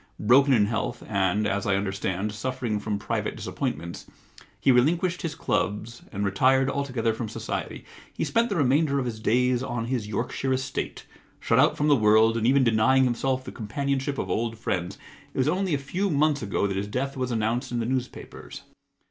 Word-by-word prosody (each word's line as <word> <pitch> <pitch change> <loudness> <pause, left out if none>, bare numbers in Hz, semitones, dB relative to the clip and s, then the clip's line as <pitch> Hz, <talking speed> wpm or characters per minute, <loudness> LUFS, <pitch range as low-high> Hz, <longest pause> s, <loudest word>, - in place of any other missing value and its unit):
Broken 135 +6 +5
in 110 -5 +5
health 115 +2 -3
and, 100 0 +1
as 100 -1 -1
I 100 - +3
understand, 95 +1 -2
suffering 115 -1 -3
from 105 -1 -2
private 105 - -3
disappointments, 85 +1 -4 0.5
he 135 - +4
relinquished 170 +8 +2
his 165 -2 -3
clubs 110 +3 -2
and 100 -1 -2
retired 130 +7 +3
altogether 130 -5 -1
from 110 0 -5
society. - - -5 0.3
He - - -3
spent 230 +1 +1
the 200 - -1
remainder 140 0 +2
of 135 - 0
his 115 -3 -4
days 125 +2 +2
on 120 -2 -3
his 120 -4 -2
Yorkshire 125 +4 -2
estate, 130 +1 -4 0.3
shut - - +2
out - - +4
from 150 - +1
the 145 - +6
world 110 0 +4
and 115 0 +1
even 135 +1 +4
denying 120 +3 +4
himself 130 +1 0
the - - -8
companionship 140 +5 -2
of - - -2
old 115 0 -2
friends. 95 -4 -3 0.4
It - - -8
was 130 +1 +2
only 180 0 +1
a - - 0
few 175 +9 -2
months 150 -1 +2
ago 100 -1 -1
that 100 -1 -1
his 100 +1 -2
death 135 +6 -3
was 130 -2 -2
announced 115 +1 -1
in 120 - -1
the 115 - -1
newspapers. 130 0 -5
120 Hz, 190 wpm, -26 LUFS, 110-135 Hz, 0.5 s, the